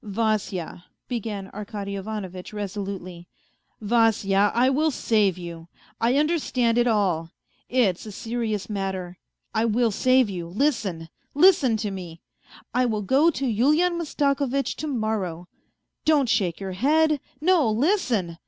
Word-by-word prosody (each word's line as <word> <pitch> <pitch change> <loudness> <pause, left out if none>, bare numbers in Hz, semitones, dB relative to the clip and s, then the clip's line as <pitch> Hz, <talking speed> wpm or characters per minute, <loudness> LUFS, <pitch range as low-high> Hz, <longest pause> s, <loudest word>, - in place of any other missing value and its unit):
" - - -35
Vasya," 205 -5 -2 0.2
began 215 -5 -4
Arkady 200 -1 -5
Ivanovitch 195 -2 -6
resolutely, 195 -4 -6 0.3
" - - -46
Vasya, 205 -4 +3
I 245 +2 +4
will 295 +4 +2
save 210 - +1
you. 170 -2 -8 0.3
I 240 +3 +2
understand 270 -7 +1
it 240 - +3
all. 185 -8 +1 0.4
It's 220 -6 +1
a - - -6
serious 220 -2 -3
matter; 190 -3 -4 0.3
I 220 +1 +1
will 230 +1 +2
save 255 +3 +3
you. 180 -4 -5
Listen! 195 - -1 0.3
listen 295 -8 +5
to 210 -2 -3
me: 175 -4 -8 0.5
I 250 +1 +2
will 215 -3 -1
go 275 - +4
to 275 -4 -2
Yulian 295 +10 +2
Mastako 285 -4 0
vitch 275 +2 -1
to 310 - -4
morrow.... 215 - -2 0.6
Don't 300 -4 +3
shake 180 -6 +1
your 195 -1 -5
head; 300 +9 +2 0.2
no, 320 -5 +3
listen 225 - 0
220 Hz, 140 wpm, -24 LUFS, 195-260 Hz, 0.6 s, listen